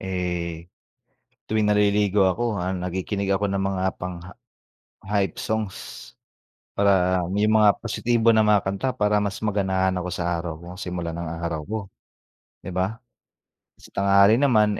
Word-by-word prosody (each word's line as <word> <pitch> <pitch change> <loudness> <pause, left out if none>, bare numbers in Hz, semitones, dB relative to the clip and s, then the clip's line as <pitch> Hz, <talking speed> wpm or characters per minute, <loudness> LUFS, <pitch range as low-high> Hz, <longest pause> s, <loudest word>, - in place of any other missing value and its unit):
eh, 90 -2 -4 0.7
tuwing 110 -1 0
naliligo 105 -1 +3
ako, 110 +3 0
ah, 90 +1 -2
nakikinig 95 +2 -3
ako 100 0 +1
ng 100 - 0
mga 95 -1 -2 0.2
pangha 90 0 -6 0.7
hype 100 -3 -1
songs. 110 -3 -2 1.0
Para 95 -3 +3
yung 105 +2 +3
mga 105 -2 +4
positibo 115 0 +1
na 110 -1 +5
mga 105 -1 +4
kanta 100 +7 -2
para 105 -3 +1
mas 100 -1 -3
maganahan 95 -3 0
ako 90 0 -3
sa 85 -1 -1
araw 85 -1 -4
ko, 85 - -11
simula 90 -2 -4
ng 85 +1 -5 0.2
araw 85 -2 -2
ko, 110 +5 -3 0.8
di - - -10
ba? 95 +5 -1 0.8
Sa - - -17
tanghali 100 +3 +4
naman, 110 -7 +3
100 Hz, 140 wpm, -24 LUFS, 90-105 Hz, 1.0 s, na